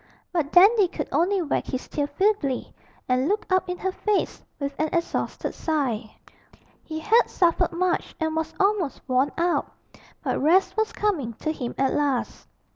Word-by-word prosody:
But 320 -4 0
Dandy 400 +2 +6
could - - -5
only 370 +2 +2
wag 295 - -1
his 260 -1 -4
tail 290 -1 -2
feebly 380 -9 0 0.3
and 255 +2 +2
look 415 +4 0
up 370 -1 +2
in 360 - -2
her 380 - -2
face 415 +1 -1 0.2
with 280 -1 -3
an 310 0 +1
exhausted 340 -1 -2
sigh. 255 -9 -2 0.7
He 315 - -6
had 450 +7 +4
suffered 345 -3 +2
much 355 +1 -1
and 320 -1 -1
was 320 0 -1
almost 390 -7 +1
worn 260 +2 +2
out; 345 0 0 0.5
but - - -1
rest 345 +7 +3
was 440 0 0
coming 320 - -1
to 310 +8 -3
him 250 -6 -5
at 270 -1 +1
last. 280 -4 -1
325 Hz, 165 wpm, -25 LUFS, 280-380 Hz, 0.7 s, Dandy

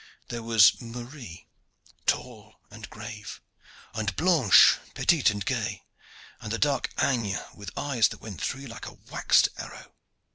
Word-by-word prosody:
There 120 -1 -4
was 115 -2 +5
Marie, 120 - -9 0.6
tall 110 -4 -2 0.2
and 110 +1 -10
grave, 105 0 -9 0.5
and 110 -2 -2
Blanche 160 - +6 0.2
petite 165 -9 +3
and 105 -1 -4
gay, 115 -6 -2 0.6
and 105 - -7
the 115 - -1
dark 140 0 +1
Agnes, 115 -7 0
with 105 -2 -9
eyes 135 -6 +2
that - - -9
went 105 -5 -9
through 135 - -3
you 140 - -8
like 115 - -9
a - - -11
waxed - - +4
arrow. - - -10
115 Hz, 145 wpm, -27 LUFS, 105-130 Hz, 0.6 s, Blanche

